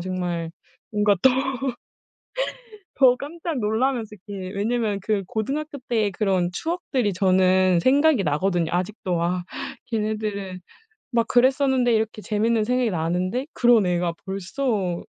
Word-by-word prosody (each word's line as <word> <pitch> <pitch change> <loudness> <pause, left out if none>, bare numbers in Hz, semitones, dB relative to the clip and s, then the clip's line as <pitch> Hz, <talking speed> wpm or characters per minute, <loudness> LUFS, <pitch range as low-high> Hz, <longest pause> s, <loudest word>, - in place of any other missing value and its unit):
정말 175 -2 -3 0.4
뭔가 210 -1 +3
또. 265 - +7 1.7
저 255 -3 +6
깜짝 320 0 -4
놀라면서 220 0 0
이렇게 190 -2 -6
왜냐하면 215 -1 0
그 205 -3 0
고등학교때 245 -3 -2
그런 190 -3 +1
추억들이 275 - -1
저는 185 -1 +3
생각이 280 - +4
나거든요. 170 +2 0
아직도 180 0 -2
막 175 +1 -1 0.4
걔네들은 210 -4 -3 0.5
막 235 -1 +2
그랬었는데 260 -1 +3
이렇게 220 -1 -1
재밌는 220 +1 +1
생각이 250 -1 +1
나는데 180 - -1
'그런 240 -4 +4
애가 175 -1 +1
벌써 195 -1 -2
210 Hz, 285 characters per minute, -23 LUFS, 185-245 Hz, 1.7 s, 또